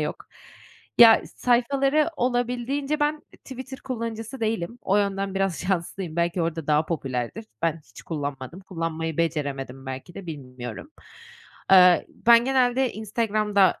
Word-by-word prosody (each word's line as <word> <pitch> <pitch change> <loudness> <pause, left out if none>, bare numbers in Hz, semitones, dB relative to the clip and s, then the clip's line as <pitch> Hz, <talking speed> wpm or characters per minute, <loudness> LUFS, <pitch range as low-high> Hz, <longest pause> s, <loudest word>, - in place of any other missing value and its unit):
yok. - - -2 0.8
Ya, 230 -1 +9
sayfaları 275 +5 +2
olabildiğince 250 +4 -1
ben 300 +1 0 0.2
Twitter 265 0 -8
kullanıcısı 230 -1 -5
değilim. 220 0 -2
O 200 - +2
yönden 195 -1 -1
biraz 195 -3 0
şanslıyım. 180 -2 -3
Belki 170 +1 0
orada 165 -2 -3
daha 150 +1 +2
popülerdir. 135 - -3 0.2
Ben 165 -1 0
hiç - - -13
kullanmadım. 145 +1 -5
Kullanmayı 165 -3 -4
beceremedim 140 -5 -2
belki 130 +6 -7
de, 195 - -9
bilmiyorum. 125 - -8 0.8
Aaa, 180 -2 +8
ben 235 0 +4
genelde 260 -1 +2
Instagram'da 210 -2 +1
195 Hz, 120 wpm, -25 LUFS, 165-240 Hz, 0.8 s, Ya